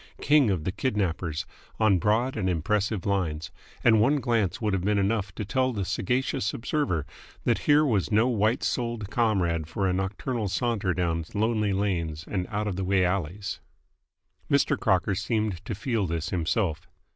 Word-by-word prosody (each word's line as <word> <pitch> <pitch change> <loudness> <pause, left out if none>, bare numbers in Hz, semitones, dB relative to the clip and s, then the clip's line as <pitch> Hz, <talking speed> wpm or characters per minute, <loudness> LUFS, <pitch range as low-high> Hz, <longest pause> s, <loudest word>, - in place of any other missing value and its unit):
King 145 -5 +4
of 90 -6 0
the 95 - -1
Kidnappers, 90 - -1 0.3
on 100 -4 +4
broad 115 +7 +1
and 95 -4 0
impressive 100 +3 0
lines, 85 -6 -1 0.3
and 110 -2 +5
one 140 +6 +3
glance 115 -6 0
would 105 -3 0
have 95 -2 0
been 105 +1 +2
enough 100 0 0
to 105 - -4
tell 130 +4 +1
the 100 -5 -2
sagacious 125 +2 -1
observer 115 - -1 0.4
that - - +2
here 150 +1 +6
was 110 -9 +1
no 110 +3 +4
white 110 -1 +1
souled 115 -4 -2
comrade 95 -9 +1
for 95 +4 -1
a 90 - +1
nocturnal 100 +4 -2
saunter 100 -3 0
down 85 -2 0
lonely 110 -1 +1
lanes 85 -6 -1
and 90 -3 -2
out 105 +1 -2
of 95 -3 -3
the 95 - -1
way 95 0 +2
alleys. 95 +2 -2 0.9
Mr. 140 -1 +3
Crocker 95 -3 +1
seemed 105 -2 -1
to 110 - -3
feel 115 -4 -1
this 85 -1 -2
himself. 85 -2 -1
100 Hz, 170 wpm, -27 LUFS, 90-115 Hz, 0.9 s, here